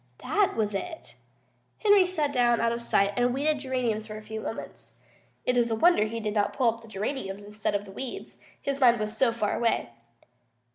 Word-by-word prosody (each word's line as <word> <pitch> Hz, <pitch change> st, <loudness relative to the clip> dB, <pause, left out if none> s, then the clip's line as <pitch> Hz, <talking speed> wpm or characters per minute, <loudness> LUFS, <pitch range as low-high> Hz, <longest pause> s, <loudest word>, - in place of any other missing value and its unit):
That 410 Hz, -2 st, +2 dB
was 210 Hz, -2 st, 0 dB
it. 325 Hz, -, -6 dB, 0.6 s
Henry 410 Hz, -4 st, +5 dB
sat 305 Hz, -6 st, -1 dB
down 240 Hz, -2 st, +3 dB
out 230 Hz, 0 st, +2 dB
of 235 Hz, 0 st, -3 dB
sight 200 Hz, -3 st, +2 dB
and 245 Hz, +1 st, +2 dB
weeded 295 Hz, +2 st, +1 dB
geraniums 245 Hz, -5 st, -2 dB
for 215 Hz, -1 st, -7 dB
a 215 Hz, -, -10 dB
few 220 Hz, +1 st, -6 dB
moments. 225 Hz, -, -7 dB, 0.5 s
It 250 Hz, -, +2 dB
is 240 Hz, -1 st, +3 dB
a 225 Hz, -, +1 dB
wonder 335 Hz, -2 st, +4 dB
he 230 Hz, +1 st, -4 dB
did 215 Hz, -2 st, -2 dB
not 205 Hz, -1 st, +1 dB
pull 240 Hz, -4 st, +2 dB
up 230 Hz, 0 st, -14 dB
geraniums 205 Hz, -1 st, -4 dB
instead 210 Hz, 0 st, -2 dB
of 205 Hz, 0 st, -2 dB
weeds, 235 Hz, +6 st, -7 dB, 0.2 s
his 275 Hz, 0 st, -3 dB
mind 240 Hz, -3 st, +5 dB
was 215 Hz, +1 st, -3 dB
so 240 Hz, +1 st, +3 dB
far 220 Hz, -3 st, -1 dB
away. 230 Hz, -, 0 dB
230 Hz, 195 wpm, -27 LUFS, 215-265 Hz, 0.6 s, Henry